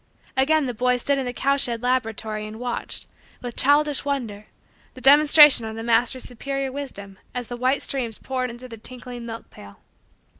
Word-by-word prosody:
Again 295 +3 +3
the 250 - -3
boy 250 +2 +1
stood 275 +3 0
in 260 - -3
the - - -2
cow 275 +3 +1
shed 235 -3 0
laboratory 220 -4 -2
and 215 +1 -9
watched, 245 -1 -3 0.4
with 245 -1 -6
childish 290 +1 +3
wonder, 235 -8 -4 0.5
the - - -10
demonstration 295 -1 +7
of 220 0 -6
the 225 - -6
master's 240 +2 +1
superior 275 +2 -4
wisdom 200 -9 -8 0.2
as 245 -2 -4
the 245 - -4
white 255 +3 0
streams 240 -5 -3
poured 255 -1 -3
into 240 +2 -9
the 230 -2 -10
tinkling 245 +1 -8
milk 230 0 -8
pail. 100 0 -14
250 Hz, 180 wpm, -23 LUFS, 230-275 Hz, 0.5 s, demonstration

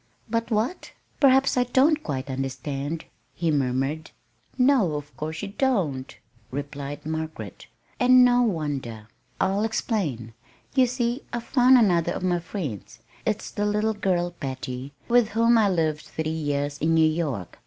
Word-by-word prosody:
"But 230 +1 -1
what 225 +10 -2 0.3
perhaps 270 -1 +5
I 250 - +4
don't 275 +5 +3
quite 135 - -4
understand," 135 +3 -4 0.3
he 165 -2 0
murmured. 140 +2 -1 0.5
"No, 250 - +3
of 145 0 -7
course 155 +4 -5
you 200 - -4
don't," 190 - -1 0.3
replied 145 +1 -6
Margaret; 160 0 -5 0.3
"and 255 0 +7
no 245 0 +4
wonder. 140 - -2 0.3
I'll 195 +2 +1
explain. 180 - -2 0.4
You 260 -2 +4
see 240 +1 -1
I've 240 -1 -3
found 255 0 +5
another 180 -8 +3
of - - -5
my 175 -1 +1
friends. 165 - -6 0.3
It's 215 -1 -1
the 205 0 -1
little 210 +1 +1
girl, 180 -4 0
Patty, 130 -4 -6 0.2
with 240 -2 +4
whom 230 +2 +3
I 215 -3 +4
lived 160 -4 0
three 160 0 -3
years 145 -2 -2
in 165 +1 +2
New 160 -1 +5
York. 150 - -3
170 Hz, 145 wpm, -25 LUFS, 145-230 Hz, 0.5 s, and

